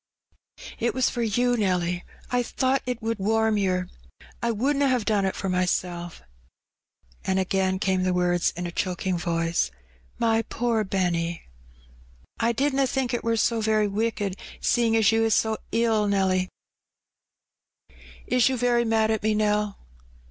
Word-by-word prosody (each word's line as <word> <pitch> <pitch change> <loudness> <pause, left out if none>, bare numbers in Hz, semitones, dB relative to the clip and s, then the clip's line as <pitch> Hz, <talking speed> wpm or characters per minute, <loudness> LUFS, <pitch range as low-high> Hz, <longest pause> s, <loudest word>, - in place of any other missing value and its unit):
'^It 235 +2 0
was 260 -1 +2
for 240 - -3
you, 245 +2 +1
Nelly, 180 -4 0 0.3
I 245 0 +2
thought 260 +2 0
^t 250 -2 -2
would 225 -1 -2
warm 220 +1 +2
yer. 185 -2 0 0.5
I 235 - 0
wouldna 275 +6 +1
*ave 250 -3 +1
done 205 -2 +1
it 190 - -1
for 195 - -4
myself." 180 - -2 1.0
And 190 - 0
again 190 0 +1
came 190 -1 0
the 185 0 +1
words, 180 -1 +1
in 180 - -3
a 175 - -4
choking 185 +1 -2
voice, 165 - 0 0.5
''My 225 -1 +2
poor 230 -2 0
Benny! 175 -4 -1 0.5
" - - -29
''I 230 +1 +2
didna 275 +2 +1
think 260 -1 -1
it 240 - -1
war 230 0 +1
so 225 +1 +1
very 215 -1 +2
wicked, 205 -2 -2 0.2
seein* 230 -2 +2
as 220 -1 +4
you 225 0 +2
is 225 -2 +3
so 220 -1 +1
ill, 225 -2 +2
Nelly. 190 -2 +1 1.8
Is 250 0 +3
you 260 - -1
very 240 0 +2
mad 220 -1 +2
at 220 - 0
me, 215 0 +1
Nell?" 210 -1 0
210 Hz, 155 wpm, -25 LUFS, 185-230 Hz, 1.8 s, as